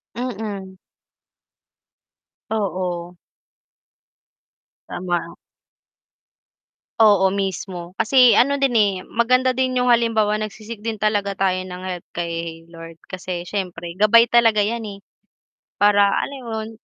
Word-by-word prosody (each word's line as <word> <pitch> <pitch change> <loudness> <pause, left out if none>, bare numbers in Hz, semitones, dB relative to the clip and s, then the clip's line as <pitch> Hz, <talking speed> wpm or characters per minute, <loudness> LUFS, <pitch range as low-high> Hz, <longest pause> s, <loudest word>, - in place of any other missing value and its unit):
Mm. 210 -6 -5 1.7
Oo. 180 -4 -3 1.7
Tama. 175 -2 -3 1.6
Oo 205 -3 +5
mismo. 190 -2 -4
Kasi 240 0 +5
ano 280 +4 +3
din, 275 -2 +1
eh, 205 -2 +3
maganda 255 +2 +2
din 255 0 -1
yung 250 - +3
halimbawa 220 -3 +2
nagsi-seek 215 +1 -7
din 225 +1 -4
talaga 205 -2 -1
tayo 185 -1 0
ng 180 0 -8
help 180 -2 -5
kay 165 -1 -4
Lord 165 0 -11 0.2
kasi 185 -1 -5
syempre 180 -2 -5
gabay 230 +2 +5
talaga 225 -3 +4
'yan, 230 +3 -2
eh, 200 -1 -9 0.8
para 205 -1 +4
alam 280 - -2
mo - - -7
yun, 220 - -7
205 Hz, 110 wpm, -21 LUFS, 180-230 Hz, 1.7 s, Oo